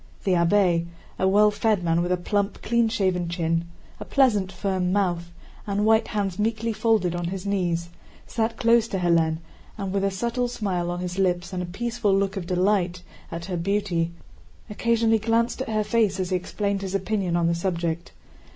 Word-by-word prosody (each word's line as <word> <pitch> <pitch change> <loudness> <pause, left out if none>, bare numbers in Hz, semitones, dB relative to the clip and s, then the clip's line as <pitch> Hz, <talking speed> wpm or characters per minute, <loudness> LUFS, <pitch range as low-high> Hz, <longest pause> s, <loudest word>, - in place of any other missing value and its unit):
The 195 - +1
abbé, 170 -1 +3 0.3
a 190 - +3
well 210 +2 +5
fed 210 -2 +1
man 165 0 +2
with 175 +1 -1
a 180 - +2
plump, 200 +3 -1
clean 235 0 +2
shaven 185 -5 0
chin, 165 -1 0 0.3
a - - -5
pleasant 210 -9 +2
firm 185 -1 -1
mouth, 175 -4 0 0.4
and 205 +1 0
white 220 +1 +4
hands 200 -3 -2
meekly 225 +1 0
folded 215 -5 +2
on 175 0 -3
his 185 +2 -4
knees, 175 -4 -1 0.4
sat 225 0 -2
close 230 -1 +4
to 195 - -3
Hélène 165 -3 +2 0.4
and, 195 -2 -4
with 200 -1 0
a 195 - +3
subtle 235 +5 -1
smile 195 -7 -2
on 175 0 -3
his 180 +1 -4
lips 180 0 0
and 180 - -2
a 180 - -4
peaceful 215 +1 0
look 195 0 0
of 185 -3 -4
delight 180 -1 +1 0.3
at 170 0 -5
her 180 -1 -3
beauty, 175 -2 0 0.6
occasionally 225 0 +2
glanced 230 +3 +1
at 260 - -4
her 215 -1 +1
face 210 -3 +1
as 185 0 -2
he - - +2
explained 200 +2 -2
his 195 0 -3
opinion 190 -2 -1
on 170 -1 +2
the 170 - +2
subject. 170 -1 -2
195 Hz, 190 wpm, -25 LUFS, 175-215 Hz, 0.6 s, well